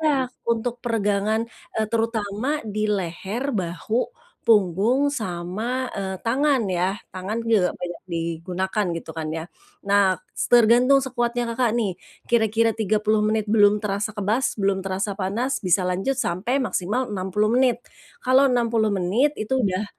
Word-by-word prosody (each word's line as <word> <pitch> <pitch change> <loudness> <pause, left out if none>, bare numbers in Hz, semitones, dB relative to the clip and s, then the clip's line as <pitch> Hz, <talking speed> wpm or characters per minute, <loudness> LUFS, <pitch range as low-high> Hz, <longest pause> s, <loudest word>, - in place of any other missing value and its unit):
iya, 280 -5 +2 0.2
untuk 235 +1 -1
peregangan, 215 -1 +1 0.3
eee, 220 0 +1
terutama 225 +4 -1
di 215 0 -2
leher, 205 +7 -2
bahu, 190 +5 -1 0.4
punggung 215 +7 +3
sama, 220 +4 -3
eee, 190 -1 -3
tangan 265 +2 +2
ya 185 +3 -1
tangan 190 +4 -4
juga 215 -6 +3
banyak 175 -1 -6
digunakan 175 +4 -2
gitu 165 - -7
kan 155 -1 -3
ya. 160 0 -4 0.4
Nah 195 -2 +3 0.2
s - - -1
tergantung 245 +4 +6
sekuatnya 240 -1 -1
Kakak 235 -2 +1
nih, 205 -5 0 0.4
kira-kira 225 -1 +3
30 215 0 +1
menit 215 0 +1
belum 205 -1 +4
terasa 210 +2 -2
kebas 215 +7 0
belum 195 -1 +1
terasa 195 +2 -2
panas 225 +8 -1
bisa 180 +1 +3
lanjut 195 +9 -1
sampai 240 +10 0
maksimal 235 +2 -1
60 190 +2 0
menit, 255 -2 +3 0.4
kalau 260 +2 +5
60 230 -3 +2
menit 200 +11 +2
itu 265 +5 0
udah 190 +2 0
215 Hz, 140 wpm, -23 LUFS, 190-240 Hz, 0.4 s, tergantung